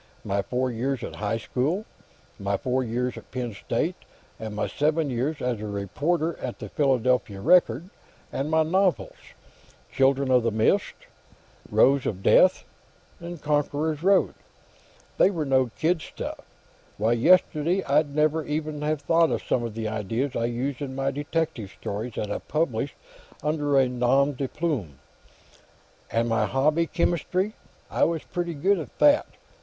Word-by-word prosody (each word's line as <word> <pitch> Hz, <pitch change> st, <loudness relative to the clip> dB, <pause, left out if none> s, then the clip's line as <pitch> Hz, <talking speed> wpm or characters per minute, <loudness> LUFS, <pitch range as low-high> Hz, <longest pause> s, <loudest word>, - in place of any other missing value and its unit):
My 100 Hz, 0 st, 0 dB
four 125 Hz, +4 st, -1 dB
years 125 Hz, +3 st, -2 dB
at -, -, -6 dB
high 105 Hz, +1 st, -1 dB
school, 145 Hz, -, -1 dB, 0.5 s
and 100 Hz, -, -9 dB
my 100 Hz, 0 st, +1 dB
four 130 Hz, +3 st, 0 dB
years 125 Hz, +1 st, -2 dB
at -, -, -19 dB
Penn 120 Hz, -3 st, -4 dB
State, 100 Hz, -, -2 dB, 0.4 s
and 110 Hz, -1 st, -6 dB
my 105 Hz, -, -1 dB
seven 150 Hz, 0 st, 0 dB
years 135 Hz, +5 st, -2 dB
as 120 Hz, -4 st, -1 dB
a 110 Hz, -, -4 dB
reporter 150 Hz, -, -2 dB
on 125 Hz, -, -3 dB
the 105 Hz, -, -8 dB
Philadelphia 125 Hz, -6 st, +1 dB
Record. 165 Hz, -, +3 dB, 0.5 s
And 140 Hz, +3 st, -2 dB
my 160 Hz, 0 st, +3 dB
novels: 185 Hz, +3 st, +1 dB, 0.8 s
'Children 135 Hz, 0 st, +2 dB
of 125 Hz, -1 st, +5 dB
the 115 Hz, -, +1 dB
Mist,' 110 Hz, 0 st, +1 dB, 0.7 s
'Rose 135 Hz, 0 st, +4 dB
of 95 Hz, -2 st, -4 dB
Death,' -, -, +5 dB, 0.8 s
'Conqueror's 150 Hz, +1 st, 0 dB
Road.' 195 Hz, +2 st, +3 dB, 0.9 s
They -, -, +6 dB
were 165 Hz, -6 st, -2 dB
no 130 Hz, -2 st, +2 dB
kid 165 Hz, +1 st, +1 dB
stuff. -, -, -6 dB, 0.6 s
Why, 110 Hz, +3 st, +1 dB
yesterday 170 Hz, +7 st, +3 dB
I'd 145 Hz, 0 st, +1 dB
never 155 Hz, +1 st, +2 dB
even 150 Hz, 0 st, -3 dB
have 150 Hz, -1 st, -1 dB
thought 165 Hz, +2 st, +4 dB
of -, -, -2 dB
some 125 Hz, -, 0 dB
of 115 Hz, -2 st, -5 dB
the 110 Hz, -1 st, -3 dB
ideas 110 Hz, +5 st, -2 dB
I 115 Hz, -, 0 dB
used 125 Hz, +3 st, -3 dB
in 135 Hz, -2 st, -4 dB
my 135 Hz, 0 st, 0 dB
detective 145 Hz, -, -3 dB
stories, 110 Hz, +4 st, -4 dB
that 105 Hz, -1 st, -3 dB
I -, -, -2 dB
published 145 Hz, -4 st, -2 dB, 0.5 s
under 145 Hz, -2 st, +1 dB
a 135 Hz, -1 st, +5 dB
nom 125 Hz, +3 st, +2 dB
de 135 Hz, +1 st, -3 dB
plume. 125 Hz, -, -3 dB, 1.1 s
And 115 Hz, +1 st, +1 dB
my 115 Hz, -1 st, +1 dB
hobby, 155 Hz, +5 st, +2 dB
chemistry; 180 Hz, +4 st, 0 dB, 0.4 s
I -, -, +1 dB
was 165 Hz, -2 st, -1 dB
pretty 175 Hz, -2 st, -4 dB
good 190 Hz, +7 st, +2 dB
at 155 Hz, -, -9 dB
that. 295 Hz, 0 st, +5 dB
135 Hz, 155 wpm, -25 LUFS, 120-155 Hz, 1.1 s, They